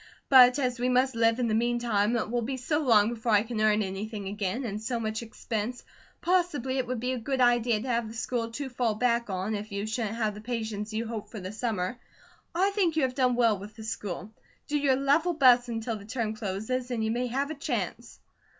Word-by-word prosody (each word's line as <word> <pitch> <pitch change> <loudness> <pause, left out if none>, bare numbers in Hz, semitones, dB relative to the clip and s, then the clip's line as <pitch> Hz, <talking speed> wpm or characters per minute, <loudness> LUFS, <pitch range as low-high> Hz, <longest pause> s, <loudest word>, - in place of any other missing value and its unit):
"But 255 -1 +8
as 250 -3 -1
we 250 +1 +1
must 255 0 +2
live 230 0 +3
in 245 -2 0
the 220 - 0
meantime, 235 -1 +1
and 230 - 0
it 215 - -9
will 240 0 +1
be 260 +3 -3
so 295 +5 0
long 225 -7 +4
before 230 -1 -1
I 205 0 +5
can 225 -2 -3
earn 215 0 +3
anything 200 +1 -5
again, 205 +5 -2
and 210 -1 -4
so 235 +1 -2
much 220 0 -2
expense, 225 +1 -4 0.4
possibly 320 -8 +1
it 250 - -1
would 250 -1 -2
be 250 +2 -1
a 255 - -2
good 265 +3 -2
idea 240 -2 +3
to 245 - -6
have 235 -2 0
the 220 - -9
school 230 0 -2
to 285 +3 -4
fall 245 -3 0
back 235 0 +1
on, 190 +3 -2
if 210 +1 -5
you 200 +1 -3
shouldn't 220 -1 -2
have 215 -2 0
the 210 - -9
patients 220 -2 -4
you 220 +2 -2
hope 220 -2 -5
for 220 - -7
this 190 +3 -7
summer. 225 -1 -2 0.6
I 385 +3 +3
think 375 -6 +1
you 315 - +2
have 260 -1 +1
done 255 -2 +2
well 230 -4 +3
with 210 +2 -10
the 220 - -9
school. 210 -3 -5 0.4
Do 295 - -2
your 275 -2 +3
level 285 +6 +2
best 250 -5 +5
until 225 0 -3
the 200 - -12
term 225 -1 -2
closes, 220 +4 -3
and 235 -3 -1
you 220 - 0
may 245 +2 -1
have 275 +5 -1
a - - -2
chance." 280 - -4
235 Hz, 235 wpm, -28 LUFS, 215-255 Hz, 0.6 s, But